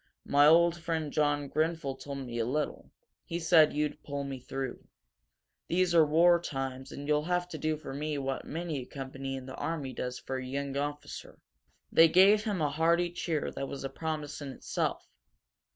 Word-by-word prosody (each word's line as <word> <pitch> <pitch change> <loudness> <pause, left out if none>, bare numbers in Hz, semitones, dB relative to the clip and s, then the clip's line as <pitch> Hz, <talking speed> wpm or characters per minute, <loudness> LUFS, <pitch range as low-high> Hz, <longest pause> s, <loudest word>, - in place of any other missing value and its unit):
My 145 +1 +5
old 170 +2 +6
friend 160 -3 -3
John 145 -1 +1
Grenfel 155 -1 -1
told 140 +1 -7
me 120 -1 -4
a - - +2
little; 150 +4 -2 0.3
he 170 - -4
said 160 -2 +6
you'd 150 0 -2
pull 140 -1 -4
me 135 -1 -5
through. 135 0 -5 0.8
These 180 0 +2
are 165 -2 +7
war 170 +3 +5
times 135 -3 -4
and 145 +1 -7
you'll 150 0 +2
have 180 0 0
to 155 - -6
do 155 +1 0
for 150 -3 -8
me 150 +1 -2
what 135 -1 -3
many 165 -2 -4
a 125 - -7
company 135 0 -5
in 130 -1 -7
the 130 - -8
army 145 -6 -3
does 125 0 -4
for 130 - -4
a 130 - -4
young 140 +1 -3
officer." 145 +1 -5 0.5
They 165 - +8
gave 195 +6 +6
him 200 -6 -1
a 145 -2 +1
hearty 170 +3 +2
cheer 165 -3 -2
that 135 - -4
was 135 - -6
a 135 - -3
promise 150 0 -4
in 140 - -5
itself. - - -2
150 Hz, 190 wpm, -30 LUFS, 135-165 Hz, 0.8 s, They